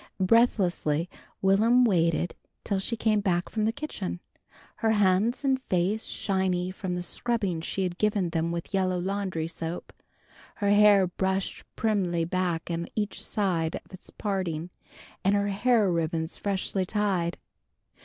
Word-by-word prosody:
Breathlessly 185 -6 +2 0.3
Will'm 225 +6 +5
waited 170 -4 +2 0.3
till 200 -2 0
she 230 +4 -1
came 215 -1 +2
back 180 -3 0
from 215 -1 -1
the 220 - +2
kitchen, 210 -10 -5 0.6
her 225 -1 +2
hands 205 +5 +2
and 265 -1 +2
face 190 +5 +1
shining 185 -2 0
from 185 -2 -3
the 180 - -3
scrubbing 200 -3 -2
she 190 +3 -2
had 180 -1 -3
given 205 -5 +1
them 165 0 0
with 170 +2 -5
yellow 185 -2 +1
laundry 185 -3 -2
soap, 165 +1 -6 0.6
her 205 -2 +1
hair 205 -2 +6
brushed 190 +2 -2
primly 185 -6 +1
back 175 -1 -1
on 170 0 -2
each 210 -1 -2
side 175 -6 0
of - - -10
its 185 - -11
parting 180 -5 -3 0.5
and 195 +2 +3
her 200 0 +1
hair 210 -1 +3
ribbons 165 -1 -1
freshly 195 -1 -1
tied. 185 -4 0
190 Hz, 145 wpm, -27 LUFS, 175-210 Hz, 0.6 s, hair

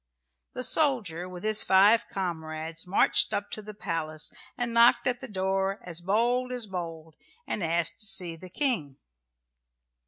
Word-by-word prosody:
The 255 - -4
soldier 215 - +2
with 180 -1 -9
his 215 0 +4
five 205 +5 +4
comrades 165 -2 -4
marched 190 - +2
up 200 - -4
to 215 - -5
the 210 0 -10
palace 160 -6 -4 0.2
and 240 -1 -3
knocked 235 +1 +5
at 250 -2 0
the 265 - -7
door 195 -1 -1
as 175 -1 -4
bold 240 +7 0
as 245 -2 +1
bold, 165 -4 -7 0.3
and 205 - -3
asked 170 0 -1
to 210 - 0
see 185 -4 0
the 180 +3 -12
King. 175 - 0
190 Hz, 155 wpm, -27 LUFS, 165-230 Hz, 0.3 s, knocked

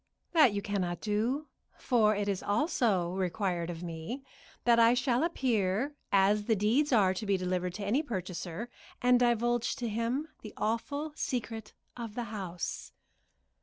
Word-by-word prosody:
"That 310 -9 +6
you 200 0 -3
cannot 185 -4 -2
do, 225 +8 0 0.3
for 215 -4 +3
it 205 0 -1
is 195 -2 -1
also 205 - +1
required 180 -2 -1
of 170 0 -6
me 170 - -5 0.4
that 235 -1 +5
I 230 +1 +6
shall 250 +1 +1
appear 245 - 0 0.2
as 200 +1 +4
the 225 - +3
deeds 230 +9 +2
are 200 -6 +4
to 190 - -5
be 200 -2 +2
delivered 180 -1 -2
to 205 0 -4
any 240 +9 +2
purchaser, 185 - -4 0.3
and 250 0 +4
divulge 240 0 +2
to 245 -3 -3
him 230 +8 -1
the 215 - -10
awful 285 +8 -2
secret 225 -6 -3 0.2
of 230 -3 -6
the 245 - -2
house." 180 -4 -5
215 Hz, 155 wpm, -31 LUFS, 190-245 Hz, 0.4 s, That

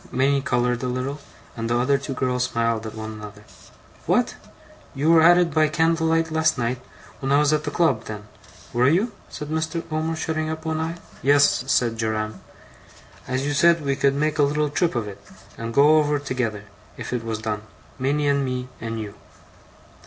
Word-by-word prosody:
Minnie 135 +2 +2
coloured 125 -2 0
a 130 - -2
little, 130 +3 -3 0.4
and 115 0 -3
the 120 - +2
other 135 +3 +2
two 135 0 -5
girls 125 -1 0
smiled 115 -2 -1
at 110 - -8
one 110 0 -6
another. 105 -1 -10 0.6
'What! - - +2 0.6
you 150 +4 +2
were 165 -1 +7
at 175 +2 +7
it 175 -3 +2
by 155 0 +4
candle 160 +1 +1
light 165 0 +1
last 160 0 +2
night, 125 +1 -1 0.4
when 135 0 -2
I 140 - +5
was 150 0 +3
at 150 0 0
the - - -1
club, 145 -8 +1
then? 105 -1 -6 0.5
Were 125 +3 +4
you?' 195 +10 +2 0.2
said 150 - -7
Mr. 160 +2 -2
Omer, 160 +1 -1
shutting 155 0 -2
up 160 0 -5
one 160 -1 -1
eye. 165 +1 -2 0.3
'Yes,' 140 -2 +4
said 115 -2 +2
Joram. 110 -2 -2 0.9
'As 130 +2 -1
you 145 - 0
said 170 +1 +4
we 140 0 +1
could 140 0 +2
make 155 +2 0
a 140 -1 +4
little 150 0 0
trip 170 -1 +1
of 115 -3 -1
it, 100 0 -9 0.3
and 115 0 -5
go 145 +5 +6
over 150 -1 +1
together, 125 -7 -3 0.3
if - - -6
it 120 -2 -2
was 115 -1 -3
done, 105 -1 -3 0.4
Minnie 145 +3 +1
and 140 0 +2
me 125 -1 -3
and 115 0 -4
you. 105 -2 -6
140 Hz, 195 wpm, -23 LUFS, 115-155 Hz, 0.9 s, were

